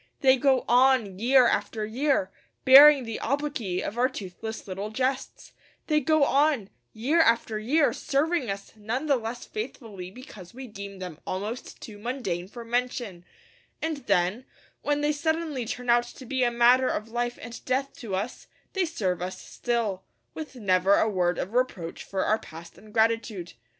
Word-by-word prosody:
They 265 -1 +6
go 265 0 +2
on, 245 -6 +3
year 255 +3 +5
after 215 -2 -1
year, 240 -3 0 0.3
bearing 275 +1 +9
the 225 -2 -5
obloquy 275 -9 -2
of 230 - -4
our 255 +1 +3
toothless 220 -1 -7
little 195 +2 -4
jests; 260 +4 -3 0.3
they 305 -1 +2
go 310 +1 +3
on, 280 -7 +2 0.2
year 280 +10 +2
after 230 -5 +2
year, 285 +8 +2
serving 290 -2 0
us 195 0 -5
none 225 +7 -3
the 285 -2 +3
less 235 0 -5
faithfully 215 -5 -7
because 205 - -12
we 260 +1 -7
deem 200 -3 -9
them 180 -4 -7
almost 210 +6 -5
too 210 -2 -10
mundane 205 -7 -3
for 235 +3 -10
mention; 240 -6 -2 0.6
and 320 -1 -2
then, 200 +5 +1 0.4
when 290 0 0
they 295 0 +2
suddenly 315 -3 -1
turn 250 +1 -5
out 240 0 +4
to 255 +2 -12
be 260 +1 0
a 240 - +3
matter 240 +2 +4
of 215 -2 -2
life 240 +1 -2
and 230 +1 -9
death 270 +2 -1
to 210 -6 -4
us, 210 +7 -4 0.3
they 385 -2 +1
serve 190 - -2
us 185 +1 -4
still, 225 -6 -2 0.3
with 310 -4 -8
never 195 -3 +3
a - - +3
word 180 -4 +1
of 195 - -4
reproach 235 -10 -1
for 190 -1 -2
our 215 +1 +2
past 165 +2 -12
ingratitude. 220 -4 -1
235 Hz, 165 wpm, -27 LUFS, 200-265 Hz, 0.6 s, bearing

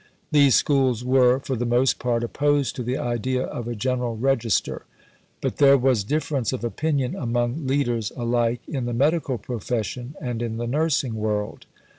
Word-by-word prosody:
These 140 -4 +5
Schools 130 -4 +2
were 125 -1 +4
for 130 - -3
the 120 - -2
most 120 +2 +2
part 120 -1 0
opposed 145 +3 0
to - - -4
the 125 +2 -2
idea 125 +2 -1
of 120 -1 -5
a 120 - -3
General 125 0 -1
Register; 120 -3 0 0.6
but - - -2
there 140 -1 +6
was 125 -5 +2
difference 145 0 -1
of 130 -2 -4
opinion 140 +1 -1
among 120 +4 -1
leaders 120 -6 0
alike 120 0 0
in 135 -6 -3
the 120 - -2
medical 145 0 +1
profession 120 +3 -4
and 120 -2 -4
in 115 -1 -3
the 120 - -3
nursing 140 -1 0
world. 105 -1 -3
125 Hz, 165 wpm, -24 LUFS, 120-135 Hz, 0.6 s, there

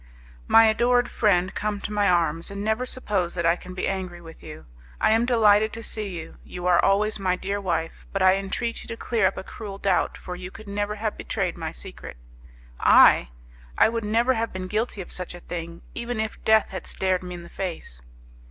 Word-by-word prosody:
"My 225 0 +7
adored 240 +2 +3
friend, 185 -4 +2
come 210 -1 -2
to 210 - -5
my 205 -1 +2
arms, 165 -2 +1
and 200 0 -5
never 220 +4 0
suppose 200 -9 -1
that 170 -1 -1
I 165 +1 +4
can 180 +1 -11
be - - -2
angry 185 -2 -3
with 165 -1 -13
you. 155 -1 -10 0.3
I - - +3
am 225 +2 +3
delighted 220 -3 +4
to 230 - -7
see 215 -2 -2
you; 160 - -10
you 180 0 -8
are 180 -1 +4
always 210 +2 +2
my 185 -2 +1
dear 200 +2 -3
wife: 165 -3 -3
but 195 -1 0
I 185 0 +7
entreat 195 +4 -2
you - - -11
to 230 - -6
clear 225 -5 +1
up - - -3
a - - -5
cruel 200 -1 -8
doubt, 195 -2 +1
for 180 - -7
you 180 0 -7
could 215 +2 -13
never 205 +1 -2
have 215 0 -3
betrayed - - -2
my - - -5
secret." - - -9 0.6
"I! - - +6 0.5
I - - +6
would 230 0 -3
never 230 +5 +2
have 230 -1 -2
been 185 0 -5
guilty 215 +1 -2
of 180 - -10
such 180 -1 -4
a - - -9
thing, 170 -1 -7
even 235 -1 -4
if 220 0 -4
death 220 -1 +4
had 190 - -6
stared 185 -1 0
me 180 -1 -7
in 175 - -9
the - - -11
face." 170 - -6
195 Hz, 215 wpm, -25 LUFS, 180-220 Hz, 0.6 s, My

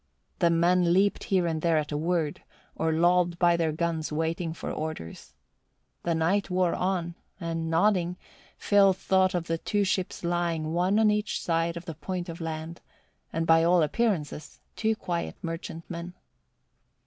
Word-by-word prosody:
The 170 - +4
men 170 +1 +3
leaped 200 +2 +2
here 185 -3 +2
and 160 -2 -1
there 165 -1 +2
at 150 -1 -2
a - - -2
word, 160 -1 -1 0.3
or 160 0 0
lolled 175 +1 +3
by 175 -1 +4
their 165 -2 +1
guns 160 0 -2
waiting 165 +2 -1
for 165 - -5
orders. 155 - -6 0.7
The 170 -1 0
night 185 +6 +1
wore 180 -1 +1
on, 180 -2 -1 0.3
and 165 -2 -3
nodding, 180 +1 +2 0.4
Phil 200 -2 +4
thought 190 0 +2
of 175 -1 -1
the 165 0 -2
two 205 +3 0
ships 185 -2 -2
lying 170 -2 -1
one 180 +4 +2
on 220 -1 +5
each 210 0 -1
side 165 0 0
of 170 - -8
the 165 - -5
point 180 +3 -5
of 165 +1 -7
land 160 +1 -5 0.5
and 165 0 -1
by 165 0 +5
all 175 0 +4
appearances 155 -5 -1 0.2
two 220 0 +1
quiet 175 -5 -3
merchantmen. 170 +1 -6
170 Hz, 160 wpm, -27 LUFS, 165-180 Hz, 0.7 s, on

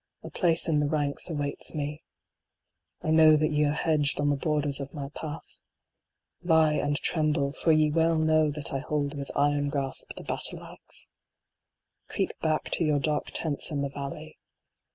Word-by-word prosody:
A - - -8
place 170 -2 +2
in 155 -3 +2
the 145 -1 +1
ranks 145 +1 -1
awaits 145 0 -4
me. 150 0 -4 1.0
I 155 - 0
know 160 -1 +7
that 155 0 +2
ye 150 0 +2
are 145 - +2
hedged 150 -2 +1
on 145 0 +2
the - - +2
borders 145 -1 -1
of 140 +2 -7
my 140 -2 -5
path. 155 +1 -8 0.8
Lie 160 -1 +4
and 145 -1 0
tremble, 150 -3 0
for 160 +3 +1
ye 155 -1 +4
well 165 +1 +2
know 155 -1 +3
that 145 -1 -1
I 135 - 0
hold 145 0 -2
with 140 -1 -6
iron 145 0 +2
grasp 135 -2 -3
the - - -8
battle - - -4
axe. - - -13 1.0
Creep - - -1
back 155 -1 -1
to - - +1
your 150 -2 +2
dark 150 +1 -1
tents 155 -1 -2
in 145 -3 -2
the 140 - -2
valley. 150 +3 -7
150 Hz, 175 wpm, -27 LUFS, 145-155 Hz, 1.0 s, know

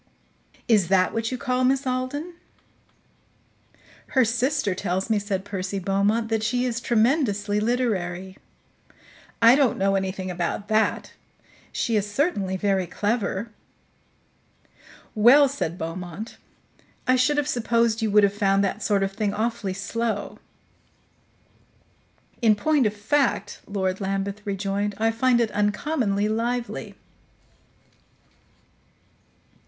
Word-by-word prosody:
"Is 210 -6 +4
that 185 -1 +2
what 225 +1 -2
you 255 - -2
call 250 +1 -1
Miss 270 +2 +2
Alden?" 260 +6 -3 1.7
"Her 260 -4 +3
sister 240 -1 0
tells 190 +2 -2
me," 215 - +3
said 200 -2 -3
Percy 195 -1 -4
Beaumont, 200 +4 0
"that 225 -1 0
she 245 +3 0
is 240 -1 -2
tremendously 220 -4 +1
literary." 190 -6 -1 1.1
"I 230 +1 +9
don't 270 -5 +2
know 195 0 +1
anything 190 -1 -2
about 180 +4 -3
that. 220 0 +1 0.6
She 230 - -1
is 205 0 -1
certainly 205 - 0
very 190 -2 0
clever." 210 +1 -2 1.6
"Well," 245 +7 +6
said 260 - -3
Beaumont, 175 +6 -6 0.7
"I 255 - +4
should 255 +4 +2
have 295 - +1
supposed 230 -1 +1
you 220 - +1
would 210 0 +5
have 200 0 +3
found 200 -1 +2
that 195 - -2
sort 200 -2 +1
of 195 - -1
thing 205 0 -2
awfully 215 -3 -2
slow." 215 +2 -3 2.0
"In 220 -3 +5
point 285 +3 +2
of 210 - -4
fact," 250 +6 0
Lord 190 -1 -2
Lambeth 195 +1 -2
rejoined, 200 +1 -2
"I 225 +1 +2
find 240 +1 +2
it 230 -2 +1
uncommonly 210 0 0
lively." 235 +2 -3
210 Hz, 120 wpm, -24 LUFS, 195-240 Hz, 2.0 s, I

